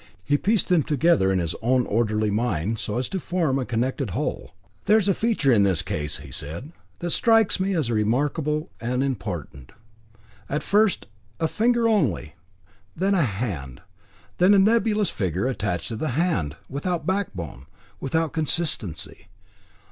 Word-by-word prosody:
He 145 - +2
pieced 205 +8 +1
them 180 -3 +4
together 140 - +2
in 95 - +2
his 85 -2 -1
own 125 +1 +2
orderly 110 -1 +1
mind, 105 -2 -1
so 105 - -3
as 125 0 -1
to 190 - -2
form 165 -6 0
a 130 - -2
connected 125 +2 -1
whole. - - -3 0.3
"There 210 +2 +5
is 205 -3 +2
a 195 - +4
feature 215 - +1
in 110 -4 +5
the 95 -5 +3
case," 75 0 -3 0.2
said 80 - -6
he, 150 - -12 0.3
"that 175 0 -3
strikes 225 -2 +4
me 190 +1 0
as 145 -8 0
remarkable 145 - 0
and 125 +2 -1
important. 95 - -5 0.8
At 150 - -1
first 210 -2 +2 0.3
a 160 - +1
finger 235 +5 +2
only, 165 - +1 0.6
then 195 +4 +1
a 190 - +3
hand, 95 - -3 0.6
then 185 +3 +6
a - - +5
nebulous 210 -1 +3
figure 95 0 -1
attached 105 -9 -2
to 115 - -3
the 155 - -2
hand, 95 - 0
without 160 +3 -3
backbone, 95 - -3 0.3
without 160 +3 -1
consistency. 155 - -1
135 Hz, 155 wpm, -24 LUFS, -, 0.8 s, then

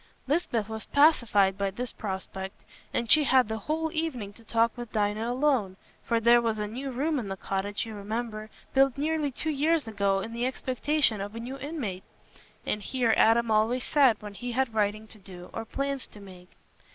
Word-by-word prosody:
Lisbeth 255 - 0
was 220 0 -6
pacified 230 -10 +4
by 200 0 +1
this 245 +6 -5
prospect. 190 -1 -6 0.3
And 235 -1 0
she 305 -1 +7
had 260 -3 +4
the 220 0 -3
whole 320 +7 -2
evening 265 -11 -3
to 230 - -16
talk 230 +1 +1
with 240 -2 -7
Dinah 215 +2 0
alone; 250 -8 +1 0.3
for 230 -1 +1
there 235 +1 +6
was 225 -2 0
a 210 - -2
new 255 +6 -5
room 285 +4 0
in 225 - -5
the 195 0 -4
cottage, 200 +3 -3
you 225 - -7
remember, 215 +1 -4 0.2
built 270 -1 +4
nearly 305 0 0
two 310 +5 -2
years 300 -1 +1
ago, 200 -2 +1
in 225 +4 -5
the 240 +2 0
expectation 260 -2 0
of 205 +2 -6
a - - -5
new 255 +4 -6
inmate; 255 - -4 0.6
and 210 - -1
here 240 +1 +1
Adam 225 +1 +4
always 225 +4 +2
sat 270 -7 +4
when 205 -1 -7
he 245 +4 -5
had 260 -2 0
writing 215 0 0
to 220 0 -12
do 180 -2 -11
or 225 - -4
plans 275 +2 -3
to 210 - -14
make. 185 -2 -13
230 Hz, 195 wpm, -28 LUFS, 205-265 Hz, 0.6 s, she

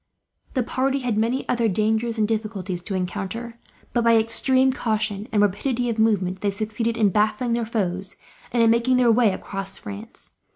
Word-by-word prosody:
The 255 - +2
party 270 +3 0
had 245 -4 -1
many 230 +5 0
other 235 -2 +1
dangers 220 +3 0
and 215 -1 +2
difficulties 210 -5 -3
to 200 - -3
encounter 205 +6 -4 0.3
but, 240 - +2
by 230 0 +5
extreme 260 +4 +3
caution 215 -4 -2
and 210 -1 +3
rapidity 240 +5 0
of 225 - -4
movement, 190 -4 +1
they 205 - +1
succeeded 220 +3 -2
in 215 -3 +4
baffling 215 +5 +1
their 235 -1 -1
foes, 190 -4 -2 0.4
and 235 -1 +3
in 225 - +5
making 235 +2 +3
their 245 -2 +5
way 225 -2 +4
across 195 +1 -4
France. 210 +2 -8
220 Hz, 175 wpm, -23 LUFS, 205-235 Hz, 0.4 s, by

